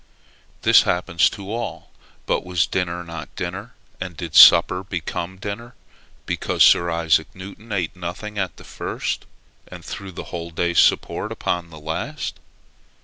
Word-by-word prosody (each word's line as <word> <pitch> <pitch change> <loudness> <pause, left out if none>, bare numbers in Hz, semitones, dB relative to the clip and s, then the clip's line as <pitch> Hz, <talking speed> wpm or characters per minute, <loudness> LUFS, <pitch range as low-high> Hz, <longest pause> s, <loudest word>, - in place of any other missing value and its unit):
This - - +7
happens 85 -2 +2
to 100 +1 -7
all; 120 - -5 0.3
but - - 0
was 90 -2 +1
dinner 90 -2 -2
not 85 -2 -9
dinner, 95 +7 -5 0.2
and 90 -3 -6
did 85 -2 -6
supper 90 - +8
become 90 -1 -4
dinner, 105 +5 -7 0.5
because - - +1
Sir 85 0 +5
Isaac 80 -1 +2
Newton 100 +4 -11
ate 90 -5 -2
nothing 90 +4 -6
at 95 -3 -3
the - - -13
first, - - -4 0.4
and - - -11
threw 100 -1 -7
the 85 - -7
whole 85 -1 -4
day's 85 +1 +1
support - - +2
upon 85 -1 -2
the 80 -1 -11
last? 105 - -4
90 Hz, 145 wpm, -22 LUFS, 85-100 Hz, 0.5 s, supper